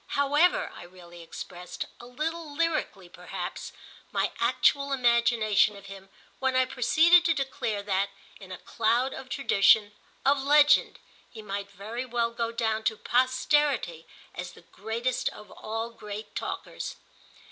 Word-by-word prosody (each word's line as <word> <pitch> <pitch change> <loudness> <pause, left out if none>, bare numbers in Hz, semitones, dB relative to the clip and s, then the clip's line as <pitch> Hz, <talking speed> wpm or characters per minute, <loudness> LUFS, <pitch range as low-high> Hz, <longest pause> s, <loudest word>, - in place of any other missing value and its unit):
However, 290 +5 +3
I - - -10
really 175 -1 -13
expressed, 175 +2 -7
a 240 - -11
little 315 +5 -4
lyrically 310 - -1
perhaps, - - -7 0.4
my - - 0
actual 280 -1 +2
imagination 235 -4 +3
of 200 0 -12
him 195 -1 -11 0.3
when 265 -1 0
I 255 0 +4
proceeded 315 +8 +5
to 330 -1 +3
declare 235 -7 -2
that, 200 0 0 0.3
in 190 -2 -12
a 185 - -6
cloud 235 +4 0
of 265 -1 -9
tradition, 215 -5 +4 0.3
of 280 0 +3
legend, 290 +1 +5 0.3
he 220 -2 -11
might 200 -1 -5
very 210 +5 -6
well 235 -1 0
go 230 0 -2
down 220 -1 -1
to 220 - +1
posterity 255 - +1 0.3
as 180 0 -7
the - - -16
greatest 225 +7 -2
of 210 - -13
all 225 +2 -5
great 210 -1 -8
talkers. - - -5
230 Hz, 140 wpm, -27 LUFS, 200-270 Hz, 0.4 s, proceeded